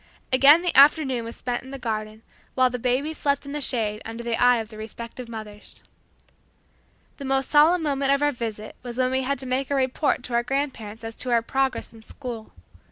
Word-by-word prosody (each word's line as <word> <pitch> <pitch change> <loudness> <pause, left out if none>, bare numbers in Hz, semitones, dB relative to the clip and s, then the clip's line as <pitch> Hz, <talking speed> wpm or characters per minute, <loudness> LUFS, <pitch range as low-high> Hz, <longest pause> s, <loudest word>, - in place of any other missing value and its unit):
Again 285 +6 +7
the 355 - 0
afternoon 275 -4 +5
was 230 - -7
spent 245 -1 -3
in 260 - -12
the 275 - -6
garden, 215 -2 -4 0.3
while 255 -1 +3
the 250 - -4
babies 260 +6 -1
slept 280 0 0
in 280 - -7
the 295 +1 -3
shade 215 -5 +1
under 230 +1 -7
the 235 -1 -1
eye 245 +1 +5
of 220 -2 -5
the 215 - -11
respective 230 +2 -8
mothers. 215 -2 -7 1.3
The 280 - -7
most 270 0 0
solemn 320 +3 +5
moment 275 -2 +1
of 280 +1 +2
our 290 - +3
visit 220 -4 -6
was 240 -1 -7
when 255 0 +1
we 260 0 +1
had 280 +2 -1
to 260 - -2
make 255 +1 -1
our 280 - +1
report 260 0 0
to 245 - -5
our 235 - +3
grandparents 240 -5 -3
as 225 0 -5
to 255 - -5
our 235 -1 +3
progress 265 +1 -1
in 225 - -14
school. 230 -1 -7
255 Hz, 215 wpm, -24 LUFS, 230-275 Hz, 1.3 s, Again